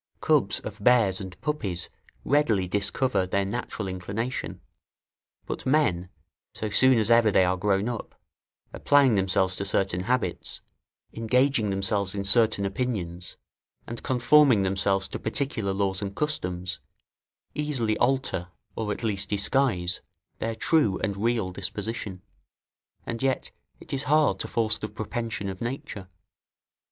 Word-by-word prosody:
Cubs - - +2
of 105 -1 -8
bears 110 -6 +4
and 95 -1 -9
puppies 100 - -2 0.3
readily 115 -10 +2
discover 100 +2 +1
their 100 +1 0
natural 105 -1 -4
inclination; 100 +7 -4 0.9
but - - -5
men, 130 - +1 0.5
so 110 -1 -4
soon 130 +3 +5
as 110 0 +2
ever 115 -1 +6
they 95 -2 +4
are 90 +1 +1
grownup, 105 +4 -1 0.6
applying 140 -4 +4
themselves 95 -1 +1
to - - -2
certain 95 -2 0
habits, 125 +2 -2 0.5
engaging 115 0 +2
themselves 100 0 0
in 100 - -2
certain 110 -1 +4
opinions, 95 -5 -3 0.5
and 120 0 -7
conforming 130 -3 +4
themselves 95 0 +1
to - - -5
particular 110 -4 -1
laws 95 0 -1
and 100 -1 -4
customs, 90 -12 -3 0.7
easily 135 -8 -1
alter, 125 -8 0 0.3
or 110 -2 -2
at 105 - -5
least 100 -3 -1
disguise, 100 -4 +1 0.4
their 115 0 -2
true 110 - +2
and 100 - -1
real 110 -2 0
disposition; 100 0 -5 0.8
and 115 0 -4
yet 135 -1 -1 0.3
it - - -10
is 135 +1 -1
hard 150 -10 +3
to - - -3
force 110 -2 0
the 110 - -4
propension 110 0 -4
of 95 -1 -6
nature. 115 -5 -5
105 Hz, 130 wpm, -26 LUFS, 95-120 Hz, 0.9 s, ever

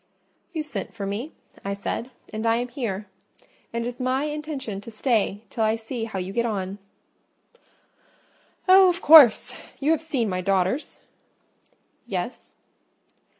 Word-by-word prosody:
"You 320 -3 -3
sent 300 -5 -6
for 200 -3 -4
me," 215 +10 -4 0.3
I 200 0 -2
said, 230 +4 -4 0.2
"and 220 +1 -2
I 225 - +4
am 245 +1 -2
here; 220 -6 -4 0.7
and 235 0 -2
it - - -2
is 245 +1 -6
my 255 +2 0
intention 295 -9 -4
to 220 - -10
stay 215 -3 0
till 225 - -1
I 220 0 +3
see 225 +1 -5
how 220 -4 -6
you 185 +1 -4
get 235 - +1
on." 200 -3 -3 1.9
"Oh, 375 0 +8
of 350 0 -1
course! 295 -10 +7 0.2
You 290 +3 +2
have 320 -2 +2
seen 275 -8 -1
my 185 -2 -2
daughters?" 195 - 0 1.1
"Yes." - - -5
235 Hz, 150 wpm, -24 LUFS, 205-280 Hz, 1.9 s, Oh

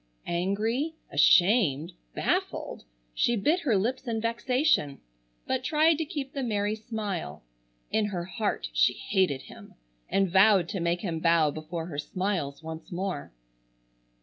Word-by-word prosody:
Angry, 215 - -1 0.2
ashamed, 175 - +4 0.2
baffled, - - -2 0.3
she 240 - +2
bit 300 - +2
her 260 - +1
lips 250 +6 -2
in 225 -1 -1
vexation, 235 - +1 0.5
but 260 -1 -1
tried 315 +2 +3
to 320 - 0
keep 280 -2 -5
the 275 - -3
merry 210 -4 0
smile. 205 - -5 0.5
In 215 -1 +2
her 180 -4 -4
heart 205 - -2
she - - +4
hated 185 -9 0
him, - - -13 0.3
and 195 0 +2
vowed 190 0 +5
to 195 - -3
make 170 +1 0
him 170 -5 -3
bow 165 -2 +3
before 160 +2 -5
her 150 -4 -5
smiles 175 -4 -3
once 160 +4 -8
more. 180 -3 -4
195 Hz, 140 wpm, -28 LUFS, 170-235 Hz, 0.5 s, vowed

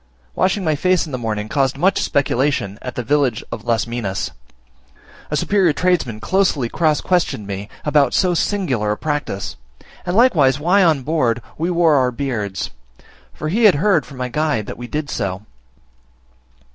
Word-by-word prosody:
Washing 190 - +1
my 160 -3 +1
face 180 +4 +1
in 155 - -9
the 130 - -2
morning 110 -2 -3
caused 135 +2 0
much 190 +6 +2
speculation 135 -7 0
at 125 -2 -6
the 125 - -3
village 135 -3 +1
of 110 - -6
Las 115 -1 +1
Minas; 115 -5 -3 1.0
a 150 - -1
superior 190 0 +2
tradesman 160 -10 0
closely 155 - +1
cross 155 0 +1
questioned 175 - 0
me 100 +1 -6 0.2
about 145 -4 +3
so 180 -2 +3
singular 160 - 0
a - - -6
practice; 145 -10 -3 0.5
and 175 - -2
likewise 150 - +4
why 180 +6 +3
on 155 -6 +3
board 125 -6 +1 0.2
we 165 +3 -2
wore 170 -3 +3
our 130 -1 +3
beards; 115 -8 -3 0.6
for 155 - -5
he 220 +7 +2
had 200 - +7
heard 180 0 +2
from 140 - -12
my 125 0 -2
guide 150 -4 -1
that - - -6
we 120 - -6
did 150 +3 -3
so. 100 -6 -3
145 Hz, 170 wpm, -19 LUFS, 120-170 Hz, 1.0 s, had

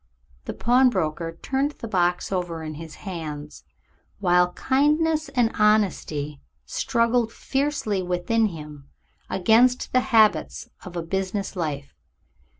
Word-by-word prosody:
The - - -5
pawnbroker 185 -10 +1
turned 275 +2 0
the 230 - -8
box 180 -3 0
over 175 -3 -3
in 155 0 -5
his 160 0 -9
hands, 155 -5 -6 0.5
while 180 -2 +3
kindness 300 - +1
and 245 -4 +1
honesty 180 -9 +1 0.2
struggled 235 - +1
fiercely 270 -8 -1
within 180 +5 +1
him 150 -5 -10 0.4
against 235 +6 +3
the 255 - +5
habits 220 -3 +3 0.2
of 185 -2 -10
a 170 - -2
business 190 +3 -3
life. 145 -5 -4
190 Hz, 115 wpm, -24 LUFS, 165-240 Hz, 0.5 s, the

